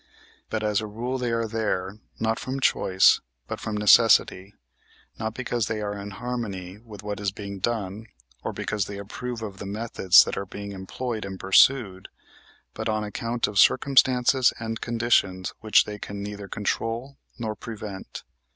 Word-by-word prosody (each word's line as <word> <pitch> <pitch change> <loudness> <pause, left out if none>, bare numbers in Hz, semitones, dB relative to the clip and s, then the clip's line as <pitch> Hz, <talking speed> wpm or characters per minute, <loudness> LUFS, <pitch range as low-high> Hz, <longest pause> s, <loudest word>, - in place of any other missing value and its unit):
But 110 -1 -2
as 105 0 +1
a 110 - -5
rule 120 +5 -3
they 120 -1 -1
are 115 0 0
there, 105 -3 -2 0.2
not 110 +1 0
from 130 +1 -4
choice, 95 -7 +4 0.3
but - - -5
from 110 -1 -3
necessity, 105 -2 +5 0.6
not 110 0 -3
because 120 -3 -1
they 110 - -2
are 105 -1 -3
in 100 0 -6
harmony 100 -4 -5
with 105 -3 -12
what 105 -1 -4
is 100 -2 -1
being 100 -1 -7
done, 110 0 -3 0.4
or - - -2
because 105 -2 -2
they 100 - -6
approve 115 +4 -6
of 100 -3 -7
the 100 - -6
methods 100 -3 +5
that - - -4
are 100 - -3
being 100 +2 -7
employed 110 +4 -5
and 95 -1 -6
pursued, 95 -1 +4 0.7
but - - -3
on 110 0 0
account 115 +3 -2
of 105 -2 -1
circumstances 130 0 +4
and 115 0 -5
conditions 115 -6 +1
which 110 -1 +4
they 105 -1 -7
can 100 0 -6
neither 100 -1 -6
control 115 +6 -3 0.2
nor 110 -3 -3
prevent. 105 -4 -8
105 Hz, 165 wpm, -25 LUFS, 100-115 Hz, 0.7 s, necessity